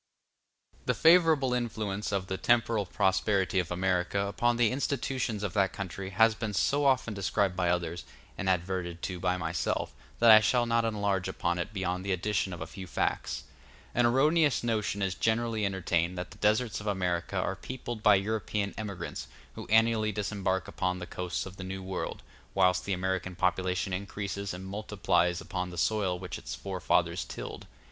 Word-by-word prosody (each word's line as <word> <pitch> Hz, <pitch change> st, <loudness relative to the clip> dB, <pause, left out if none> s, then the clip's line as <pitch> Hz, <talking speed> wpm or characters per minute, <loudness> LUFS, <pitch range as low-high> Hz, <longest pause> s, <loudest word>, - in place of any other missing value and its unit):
The -, -, +2 dB
favorable 160 Hz, -6 st, +5 dB
influence 110 Hz, -5 st, -2 dB
of 100 Hz, -2 st, -1 dB
the 95 Hz, -, -3 dB
temporal 115 Hz, -3 st, +2 dB
prosperity 95 Hz, +1 st, +1 dB
of 85 Hz, -2 st, -2 dB
America 90 Hz, +1 st, 0 dB
upon 120 Hz, +4 st, +1 dB
the 120 Hz, -3 st, +3 dB
institutions 130 Hz, -5 st, -1 dB
of 100 Hz, -4 st, -2 dB
that 100 Hz, -2 st, +2 dB
country 95 Hz, 0 st, -5 dB
has 110 Hz, +4 st, +4 dB
been 105 Hz, -2 st, -4 dB
so 145 Hz, +9 st, +2 dB
often 130 Hz, -4 st, +2 dB
described 100 Hz, -1 st, 0 dB
by 90 Hz, -1 st, +1 dB
others, 85 Hz, 0 st, -1 dB, 0.3 s
and 95 Hz, -2 st, -2 dB
adverted 90 Hz, -1 st, -1 dB
to 90 Hz, -2 st, -3 dB
by 90 Hz, 0 st, +1 dB
myself, 90 Hz, -, -2 dB, 0.2 s
that 115 Hz, -1 st, +7 dB
I 110 Hz, -, +11 dB
shall 120 Hz, +3 st, +2 dB
not 115 Hz, 0 st, +2 dB
enlarge 100 Hz, -4 st, 0 dB
upon 85 Hz, -2 st, -1 dB
it 85 Hz, -, -3 dB
beyond 95 Hz, -2 st, -2 dB
the 100 Hz, -1 st, 0 dB
addition 95 Hz, +1 st, -1 dB
of 85 Hz, -, -7 dB
a -, -, -3 dB
few 95 Hz, -2 st, -9 dB
facts. 70 Hz, -, -2 dB, 0.5 s
An 120 Hz, 0 st, +4 dB
erroneous 150 Hz, +4 st, +3 dB
notion 105 Hz, -3 st, 0 dB
is 95 Hz, -1 st, 0 dB
generally 110 Hz, 0 st, 0 dB
entertained 90 Hz, -2 st, 0 dB
that 90 Hz, +1 st, -5 dB
the 100 Hz, -, -14 dB
deserts 110 Hz, +1 st, +1 dB
of 105 Hz, -, -7 dB
America 90 Hz, -2 st, -1 dB
are 95 Hz, +1 st, 0 dB
peopled 120 Hz, 0 st, -6 dB
by 105 Hz, -1 st, +6 dB
European 105 Hz, 0 st, -1 dB
emigrants, 100 Hz, -5 st, -5 dB, 0.3 s
who -, -, -8 dB
annually 110 Hz, -1 st, +3 dB
disembark 95 Hz, -2 st, -1 dB
upon 90 Hz, -1 st, -1 dB
the 90 Hz, -, -6 dB
coasts 90 Hz, 0 st, -3 dB
of 95 Hz, 0 st, -10 dB
the 95 Hz, -, -6 dB
New 95 Hz, 0 st, -5 dB
World, 95 Hz, 0 st, -4 dB, 0.3 s
whilst 90 Hz, -1 st, +3 dB
the 100 Hz, -, 0 dB
American 95 Hz, 0 st, -2 dB
population 90 Hz, +1 st, 0 dB
increases 100 Hz, +1 st, -4 dB
and 90 Hz, +1 st, -7 dB
multiplies 95 Hz, -4 st, 0 dB
upon 90 Hz, 0 st, -4 dB
the 90 Hz, -, -9 dB
soil 95 Hz, -1 st, +1 dB
which 90 Hz, -1 st, -6 dB
its -, -, -6 dB
forefathers 95 Hz, -2 st, 0 dB
tilled. -, -, -7 dB
100 Hz, 175 wpm, -29 LUFS, 90-110 Hz, 0.5 s, I